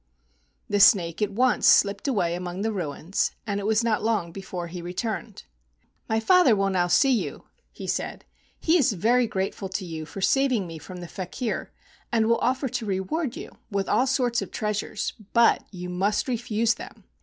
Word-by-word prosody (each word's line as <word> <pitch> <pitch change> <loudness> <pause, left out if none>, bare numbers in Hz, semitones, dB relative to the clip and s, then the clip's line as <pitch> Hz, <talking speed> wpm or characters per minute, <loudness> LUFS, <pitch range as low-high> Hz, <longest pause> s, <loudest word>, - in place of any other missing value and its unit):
The 205 - 0
snake 175 -3 +5
at 210 - +2
once 245 +5 +2
slipped 200 +7 +4
away 190 -10 +1
among 180 +2 -4
the 225 - 0
ruins, 170 0 -2
and 200 -2 -2
it 200 - -3
was 220 +1 +2
not 225 -2 +1
long 210 -6 0
before 180 -1 -6
he 175 +1 -7
returned. 190 +4 -4 0.7
[_"My 220 0 +2
father 285 - +5
will 195 -1 +1
now 180 -2 +2
see 270 +9 +4
you," 245 - -1 0.3
he - - -9
said. - - -3 0.3
"He 340 +2 +3
is 245 -6 +3
very 235 +6 +2
grateful 190 0 -3
to 190 0 -3
you 160 -2 -6
for 145 +5 -8
saving 255 0 +2
me 165 -2 -8
from 180 +3 -9
the 175 - -7
faker, 195 +6 -4 0.4
and 225 -2 +2
will 230 +1 +2
offer 260 +2 0
to 230 - -3
reward 215 - -2
you - - -8 0.2
with 200 -3 -1
all 260 - +2
sorts 245 -3 +1
of - - -5
treasures, 210 -1 -3 0.2
but 235 -1 +4
you 180 -2 -7
must 190 +4 0
refuse 230 -2 +1
them. - - -11
205 Hz, 185 wpm, -25 LUFS, 180-235 Hz, 0.7 s, snake